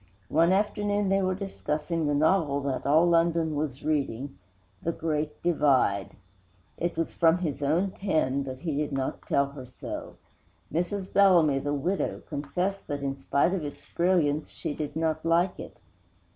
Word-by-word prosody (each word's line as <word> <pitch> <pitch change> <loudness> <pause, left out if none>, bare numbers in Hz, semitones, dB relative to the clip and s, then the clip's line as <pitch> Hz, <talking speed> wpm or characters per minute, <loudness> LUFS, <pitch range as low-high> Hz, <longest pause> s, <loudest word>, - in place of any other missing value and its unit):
One 165 +3 +4
afternoon 205 0 +1
they 195 0 +3
were 185 0 0
discussing 165 -4 -2
the 145 - +1
novel 155 -2 +2
that 140 -1 -2
all 155 +4 +5
London 165 -2 +2
was 145 -2 -3
reading, 140 -3 -1 0.5
The 165 - 0
Great 155 -2 -3
Divide. 130 - +2 0.6
It 175 +1 -2
was 165 - -1
from 165 0 +4
his 155 -6 -3
own 165 +7 +1
pen, 155 -10 0
but 130 -1 -6
he 160 -5 -2
did 150 0 -1
not 135 -1 -3
tell 140 0 +2
her 130 -3 -9
so. 125 - -7 0.6
Mrs. 185 +4 -2
Bellamy 175 -8 +5
the 145 +1 -1
widow 175 +7 -2
confessed 180 +7 -3
that, 145 -1 -3
in 135 -1 -1
spite 140 +5 +1
of 185 -5 -2
its 145 - -7
brilliance, 165 -4 +2
she - - -4
did 150 -1 -5
not 160 -1 0
like 170 +2 +2
it. - - -9
155 Hz, 160 wpm, -27 LUFS, 140-175 Hz, 0.6 s, all